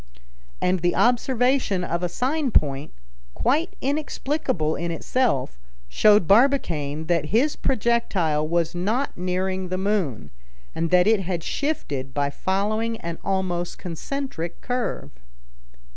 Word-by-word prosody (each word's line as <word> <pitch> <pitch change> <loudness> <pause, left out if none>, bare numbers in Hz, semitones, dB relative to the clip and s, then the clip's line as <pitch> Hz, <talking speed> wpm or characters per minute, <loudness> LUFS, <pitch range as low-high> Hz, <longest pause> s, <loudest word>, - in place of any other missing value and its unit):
And 180 0 +1
the 175 +1 +1
observation 245 -4 +2
of 170 0 -2
a 180 - -1
sign 270 - 0
point, 140 - +1 0.4
quite 315 +7 +1
inexplicable 280 - -1
in 170 - -3
itself, 165 - 0 0.3
showed 210 - +5
Barbicane 170 - +2
that 165 -2 +1
his 240 - +2
projectile 195 - +1
was 170 0 0
not 215 +10 -1
nearing 185 +1 -2
the 185 - -1
moon, 185 - -1 0.4
and 165 0 -1
that 180 +1 +5
it 220 0 +4
had 175 -3 -3
shifted 140 - -3
by 140 -1 0
following 215 +7 -1
an 170 0 -5
almost 185 -3 -1
concentric 175 - -5
curve. 250 -1 -3
185 Hz, 120 wpm, -24 LUFS, 165-240 Hz, 0.4 s, showed